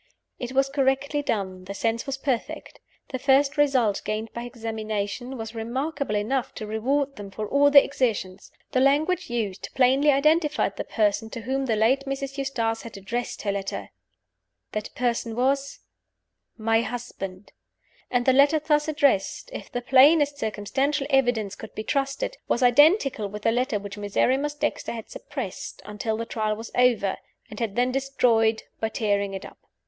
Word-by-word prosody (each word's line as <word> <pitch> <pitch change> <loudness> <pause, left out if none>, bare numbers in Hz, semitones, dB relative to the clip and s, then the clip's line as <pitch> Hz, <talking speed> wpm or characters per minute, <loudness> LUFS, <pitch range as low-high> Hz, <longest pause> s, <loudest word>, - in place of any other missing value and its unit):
It 250 +1 -5
was 270 +1 +3
correctly 275 +1 +1
done: 190 -8 -3
the 200 +1 -6
sense 230 +5 -1
was 275 0 -2
perfect. 265 -4 -3 0.3
The 260 - -4
first 275 +1 +3
result 260 -9 +2
gained 215 +1 -3
by 235 0 -5
examination 225 +1 -4
was 225 0 -6
remarkable 260 +2 -2
enough 235 +5 -1
to 215 - -5
reward 270 +6 -1
them 205 -1 -7
for 210 +2 -5
all 285 +4 +4
their 285 -1 +8
exertions. 210 -8 -2 0.2
The 255 - +2
language 290 +7 +2
used 215 -5 -3
plainly 265 +3 +4
identified 305 +2 +2
the - - -3
person 215 0 0
to 230 - -6
whom 265 +3 -2
the 225 - +2
late 250 +6 +2
Mrs. 275 0 -4
Eustace 230 -5 -1
had 230 -3 -9
addressed 235 +5 -4
her 200 - 0
letter. 195 -1 -4 0.8
That 215 0 -4
person 235 -2 -1
was 275 +3 0 0.8
my 225 0 +2
husband. 215 -5 -6 0.6
And 245 -1 +1
the 260 - +5
letter 280 +4 +5
thus 300 0 +1
addressed 290 - +1
if - - -8
the 245 - -3
plainest 285 +3 +5
circumstantial 265 +7 -1
evidence 245 -7 +2
could 220 - -10
be 215 - -4
trusted 275 - -1
was 240 - +1
identical 275 - +4
with 210 +1 -8
the 225 - +3
letter 245 -1 0
which 205 0 -8
Miserrimus 260 +8 +1
Dexter 300 -4 -2
had 225 -2 -8
suppressed - - -6
until 210 +1 -3
the 230 - -3
Trial 215 -2 -1
was 225 +2 -8
over, 235 -6 +2 0.3
and 210 - -8
had 225 -4 -2
then 245 +1 +2
destroyed 240 -5 +2 0.2
by 220 - -1
tearing 200 -3 0
it 190 - -6
up. - - -13
245 Hz, 165 wpm, -25 LUFS, 215-275 Hz, 0.8 s, their